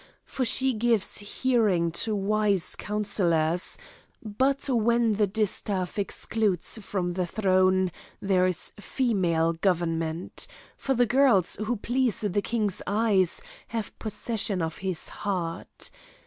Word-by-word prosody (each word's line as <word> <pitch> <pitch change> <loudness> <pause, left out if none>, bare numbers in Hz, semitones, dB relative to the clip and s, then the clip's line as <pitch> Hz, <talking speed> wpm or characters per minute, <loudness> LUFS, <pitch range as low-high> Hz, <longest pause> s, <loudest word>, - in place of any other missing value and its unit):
For 260 - -3
she 265 +2 +3
gives 225 -2 +2
hearing 205 -6 +1
to 215 +6 -2
wise 200 -2 +1
councillors; 180 -5 0 0.5
but 260 +7 0
when 235 -2 +2
the 210 0 +2
distaff 200 -2 -2
excludes 205 0 -1
from 185 -3 -2
the 180 0 -1
throne, 185 -1 +2 0.3
there 185 -2 +2
is 180 -3 -1
female 180 -9 +1
government; 165 -1 -1 0.3
for 270 - -1
the 245 0 +4
girls, 240 -8 +3
who 215 +4 -1
please 245 +1 0
the 205 -1 0
king's 210 -3 -1
eyes, 205 - +2 0.2
have 225 -2 -4
possession 215 -2 -1
of 160 -1 -4
his 185 -3 -2
heart. 180 -5 -4
205 Hz, 120 wpm, -27 LUFS, 180-225 Hz, 0.5 s, the